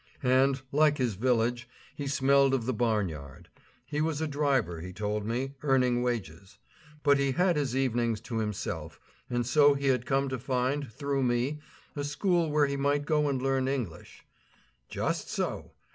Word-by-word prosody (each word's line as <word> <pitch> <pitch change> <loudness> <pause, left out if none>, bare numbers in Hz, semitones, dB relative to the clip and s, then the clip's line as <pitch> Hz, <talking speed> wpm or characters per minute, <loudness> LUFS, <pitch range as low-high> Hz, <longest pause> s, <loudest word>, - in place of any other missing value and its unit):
And, 130 +1 +3
like 150 0 +3
his 125 -4 0
village, 120 +2 0 0.3
he 145 - -4
smelled 140 0 +3
of 120 -4 -2
the 130 - 0
barn 110 -3 +1
yard. 70 -4 -10 0.4
He 150 +3 -2
was 155 -1 0
a 160 - -1
driver, 140 - 0
he 90 +2 -7
told 105 +1 -3
me, 130 +4 -2
earning 125 -4 +2
wages. 100 -6 -4 0.5
But 140 -1 +4
he 140 -1 +1
had 180 +4 +2
his 140 -4 -1
evenings 120 -4 0
to 120 -2 -4
himself; 90 -7 -4 0.3
and 120 -1 -1
so 145 +3 +5
he 140 0 0
had 125 -2 +1
come 135 0 +1
to 130 -1 -3
find, 130 +1 -1
through 140 +4 -2
me, 125 +4 0 0.4
a 145 - -3
school 170 +3 +1
where 150 0 +3
he 140 0 -2
might 145 +1 +1
go 150 -1 +2
and 135 -2 -1
learn 135 0 0
English. 125 - -5 0.6
Just - - -2
so! - - -3
130 Hz, 175 wpm, -29 LUFS, 115-140 Hz, 0.6 s, so